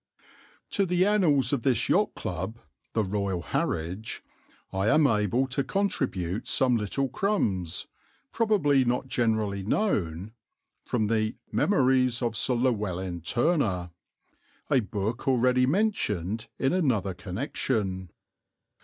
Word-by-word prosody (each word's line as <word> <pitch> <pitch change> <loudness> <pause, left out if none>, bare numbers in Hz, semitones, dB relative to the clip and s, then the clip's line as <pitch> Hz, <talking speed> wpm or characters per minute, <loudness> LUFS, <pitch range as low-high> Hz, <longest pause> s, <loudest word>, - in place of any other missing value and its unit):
To 195 -1 +1
the 180 +1 +2
annals 170 -10 +3
of 135 - +1
this 125 -2 +1
Yacht 210 +2 +2
Club 95 +6 -4 0.4
(the 110 - +1
Royal 95 -3 -2
Harwich) 90 +7 -3 0.5
I 95 +2 0
am 150 +6 +5
able 115 +1 +2
to 135 +2 0
contribute 125 - -1
some 130 -2 +3
little 115 +5 0
crumbs, 110 - -1 0.5
probably 190 - +3
not 125 +1 0
generally 110 -5 0
known, 100 - -1 0.6
from 115 -3 0
the 110 0 0 0.2
Memories 130 - +2
of 115 -2 -1
Sir 125 +3 +1
Llewelyn 95 -8 -1
Turner, 110 - 0 0.8
a 135 - +5
book 110 +3 -3
already 125 0 +3
mentioned 115 - 0
in 135 - +1
another 120 - +1
connection. 95 - -3
115 Hz, 115 wpm, -27 LUFS, 100-135 Hz, 0.8 s, am